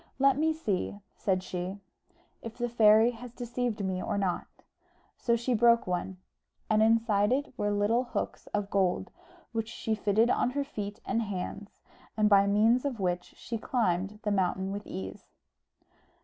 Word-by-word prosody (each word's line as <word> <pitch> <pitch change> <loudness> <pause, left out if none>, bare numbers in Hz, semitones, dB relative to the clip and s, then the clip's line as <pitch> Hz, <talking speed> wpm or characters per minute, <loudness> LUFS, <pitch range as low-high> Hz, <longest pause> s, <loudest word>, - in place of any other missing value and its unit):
"Let 275 0 +4
me 315 +3 +2
see," 205 - -2 0.2
said 185 -2 0
she, 185 +2 -4 0.6
"if 230 0 -8
the 240 -1 -1
fairy 225 0 +6
has 245 +1 -10
deceived 240 -3 -3
me 185 -1 -2
or 205 - -2
not." 190 -3 -1 0.7
So 235 -1 +1
she 235 +2 -1
broke 235 +1 +4
one, 180 +1 -3 0.5
and 215 0 +4
inside 220 -2 +3
it 280 +2 0
were 205 -4 -1
little 205 +5 +2
hooks 240 - -4
of 205 -1 -3
gold, 190 -3 +1 0.4
which 225 -1 -2
she 225 -1 -3
fitted 215 +3 +2
on - - +2
her 285 - +2
feet 205 -6 -6
and 230 - 0
hands, 200 0 -5 0.5
and 210 -1 +4
by 200 0 +6
means 220 +5 +4
of 270 -6 -3
which 180 -2 -2
she 230 -1 -5
climbed 200 -4 0
the 210 - 0
mountain 190 0 0
with 205 +1 -6
ease. 95 0 -7
215 Hz, 165 wpm, -29 LUFS, 195-235 Hz, 0.7 s, fairy